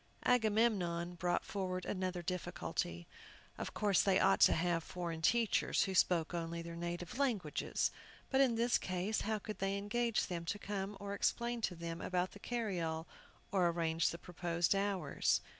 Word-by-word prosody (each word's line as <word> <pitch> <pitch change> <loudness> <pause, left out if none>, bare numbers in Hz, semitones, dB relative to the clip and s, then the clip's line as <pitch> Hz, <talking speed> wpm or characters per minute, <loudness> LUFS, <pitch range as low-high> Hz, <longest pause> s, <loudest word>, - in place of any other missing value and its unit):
Agamemnon 210 -7 +2
brought 175 0 0
forward 185 -2 -3
another 185 -2 -2
difficulty. 85 - -3 0.5
Of - - -5
course 205 -3 +3
they 195 -2 +3
ought 195 - +4
to - - +7
have 170 0 +1
foreign 170 -2 -4
teachers, 230 +5 +3
who 190 - -2
spoke 175 -2 +3
only 170 0 -3
their 170 0 -7
native 175 +6 -4
languages. 215 - 0 0.4
But, 270 0 +4
in 255 -4 +4
this 235 +1 +3
case, 185 +4 -1
how 220 0 0
could 215 +1 -7
they 195 +1 0
engage 225 +3 0
them 175 -3 -4
to 200 - -2
come, 200 -1 -4
or 200 0 -4
explain 235 +3 0
to 185 - -1
them 170 0 -5
about 180 0 0
the 205 - -12
carryall, 180 -10 -2 0.5
or 185 -4 +3
arrange 165 -1 +1
the 170 - -5
proposed 175 0 0
hours? 195 -6 +1
185 Hz, 160 wpm, -36 LUFS, 170-205 Hz, 0.5 s, to